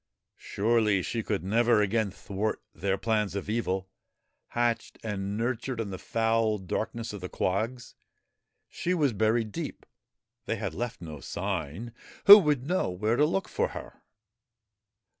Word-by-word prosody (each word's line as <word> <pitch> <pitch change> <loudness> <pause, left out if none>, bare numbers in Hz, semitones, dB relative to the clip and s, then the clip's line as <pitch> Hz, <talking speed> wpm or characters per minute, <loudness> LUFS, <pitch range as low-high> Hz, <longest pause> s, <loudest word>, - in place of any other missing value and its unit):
Surely 105 -2 +1
she 115 - -2
could 105 -3 -2
never 115 +3 +3
again 105 +1 +1
thwart 100 +2 -3
their 95 +3 -1
plans 105 -1 0
of 100 - -4
evil, 95 -4 -1 0.6
hatched 120 -1 -1
and 100 -2 -3
nurtured 120 +1 -2
in 105 -3 -3
the 95 - -6
foul 115 -1 +1
darkness 110 +4 -4
of 100 - -7
the 90 - -5
quags. 115 +6 -2 0.7
She 180 +1 -1
was 145 -7 +2
buried 110 +1 +1
deep; - - -6 0.6
they - - 0
had - - -4
left 120 -4 -4
no 80 -3 -7
sign; 95 +6 -4 0.3
who 205 +1 +13
would 150 -7 +1
know 180 - 0
where 105 +6 0
to 150 - +4
look 185 +4 -1
for - - 0
her - - -10
110 Hz, 145 wpm, -28 LUFS, 100-120 Hz, 0.7 s, who